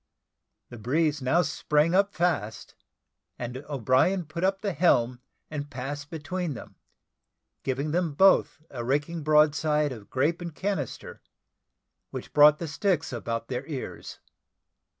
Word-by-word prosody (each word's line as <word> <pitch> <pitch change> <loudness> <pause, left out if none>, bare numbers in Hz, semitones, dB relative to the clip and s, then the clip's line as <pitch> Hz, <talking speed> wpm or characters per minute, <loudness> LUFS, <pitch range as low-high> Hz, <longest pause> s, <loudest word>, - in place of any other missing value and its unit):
The 120 - -10
breeze 145 +5 +1
now 160 +8 +3
sprang 155 +1 +1
up 200 +2 +3
fast, 145 - -1 0.6
and 125 +1 -5
O'Brien 140 - +2
put 155 +3 -6
up 195 +1 +1
the 200 -3 -1
helm 125 -7 +2 0.3
and 145 -1 -4
passed 145 +2 -6
between 165 0 -4
them, - - -10 0.9
giving 135 +3 -2
them 170 -3 0
both 190 0 +4
a 120 -3 -5
raking 145 +6 -1
broadside 150 0 +3
of 110 -5 -9
grape 155 +7 0
and 170 -3 -6
cannister, 190 - -4 0.9
which - - -8
brought 150 0 +7
the 170 - -5
sticks 160 -1 -1
about 115 -1 -3
their 125 0 -3
ears. 140 -5 -6
150 Hz, 130 wpm, -27 LUFS, 130-170 Hz, 0.9 s, brought